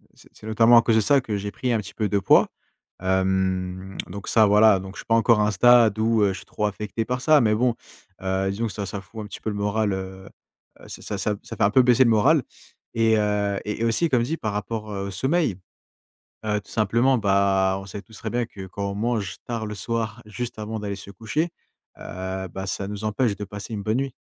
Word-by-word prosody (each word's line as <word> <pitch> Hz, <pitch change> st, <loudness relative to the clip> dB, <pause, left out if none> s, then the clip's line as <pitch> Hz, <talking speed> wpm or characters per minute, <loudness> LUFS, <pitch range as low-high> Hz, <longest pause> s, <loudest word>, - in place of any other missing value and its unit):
c'est -, -, -19 dB
c'est 110 Hz, -, -12 dB
notamment 115 Hz, +2 st, +5 dB
à -, -, +8 dB
cause 115 Hz, -1 st, +2 dB
de 110 Hz, -, +4 dB
ça 140 Hz, +6 st, +4 dB
que 110 Hz, -4 st, -3 dB
j'ai 100 Hz, +1 st, -4 dB
pris 125 Hz, +5 st, -2 dB
un 115 Hz, -, +1 dB, 0.2 s
peu 110 Hz, -, +1 dB
de 100 Hz, -, +1 dB
poids, 95 Hz, -, +5 dB, 0.5 s
hem, 95 Hz, 0 st, -1 dB
donc 100 Hz, +2 st, -8 dB
ça, 110 Hz, -2 st, +5 dB
voilà, 105 Hz, 0 st, +5 dB
donc 95 Hz, +1 st, -9 dB
je -, -, -9 dB
suis -, -, -9 dB
pas 115 Hz, -, +2 dB
encore 115 Hz, -1 st, +4 dB
à -, -, +3 dB
un -, -, +1 dB
stade 115 Hz, -2 st, +5 dB
où 110 Hz, -1 st, +2 dB
je 100 Hz, -, +2 dB
suis 95 Hz, -, -9 dB
trop 105 Hz, -, -3 dB
affecté 105 Hz, +2 st, -4 dB
par 125 Hz, +1 st, -2 dB
ça, 155 Hz, 0 st, +5 dB
mais 110 Hz, -2 st, +3 dB
bon, 120 Hz, +2 st, +1 dB, 0.5 s
heu, 95 Hz, 0 st, 0 dB
disons 110 Hz, +4 st, -2 dB
que 105 Hz, -, -6 dB
ça 100 Hz, -, -4 dB
ça 100 Hz, +1 st, -5 dB
fout 110 Hz, +3 st, -9 dB
un -, -, -9 dB, 0.2 s
peu 110 Hz, -, -1 dB
le 105 Hz, -, -5 dB
moral, 105 Hz, +1 st, 0 dB
heu, 95 Hz, 0 st, -7 dB, 0.5 s
heu, -, -, -14 dB
ça 105 Hz, -, -6 dB
ça 105 Hz, +1 st, -1 dB
ça -, -, -9 dB
fait -, -, -2 dB
un 100 Hz, -, +4 dB
peu 130 Hz, -, +5 dB
baisser 125 Hz, +1 st, +5 dB
le 120 Hz, -, +3 dB
moral. 135 Hz, +7 st, +4 dB, 0.5 s
Et, 115 Hz, -1 st, +3 dB
heu, 105 Hz, -1 st, 0 dB
et 105 Hz, +2 st, -3 dB
aussi, 115 Hz, +9 st, +2 dB
comme 125 Hz, -4 st, +2 dB
dit, 160 Hz, +6 st, -2 dB
par 110 Hz, -9 st, -3 dB
rapport, 105 Hz, +1 st, -4 dB
heu, 100 Hz, -1 st, -4 dB
au -, -, -4 dB
sommeil, 130 Hz, -, 0 dB, 0.9 s
heu, 105 Hz, -1 st, 0 dB
tout -, -, -17 dB
simplement, 115 Hz, +5 st, +2 dB
bah, 95 Hz, -2 st, +2 dB
on -, -, -10 dB
sait 100 Hz, +1 st, -7 dB
tous 110 Hz, -, -21 dB
très -, -, -5 dB
bien 120 Hz, 0 st, -1 dB
que, 95 Hz, -4 st, -10 dB
quand 100 Hz, +2 st, -4 dB
on -, -, -6 dB
mange 105 Hz, -3 st, -2 dB
tard 115 Hz, -2 st, -3 dB
le 105 Hz, -, -5 dB
soir 110 Hz, +1 st, -3 dB
juste 120 Hz, +2 st, -6 dB
avant 110 Hz, +1 st, -4 dB
d'aller 100 Hz, -1 st, -4 dB
se 100 Hz, 0 st, -11 dB
coucher, 115 Hz, -, -2 dB, 0.5 s
heu, 95 Hz, +1 st, -5 dB
bah, 95 Hz, +3 st, -6 dB
ça 100 Hz, +1 st, -3 dB
nous 105 Hz, +1 st, -6 dB
empêche 110 Hz, 0 st, 0 dB
de 105 Hz, -, -6 dB
passer 100 Hz, +3 st, -8 dB
une 105 Hz, -, -3 dB
bonne 110 Hz, +3 st, 0 dB
nuit. 135 Hz, -1 st, -2 dB
105 Hz, 240 wpm, -24 LUFS, 100-115 Hz, 0.9 s, à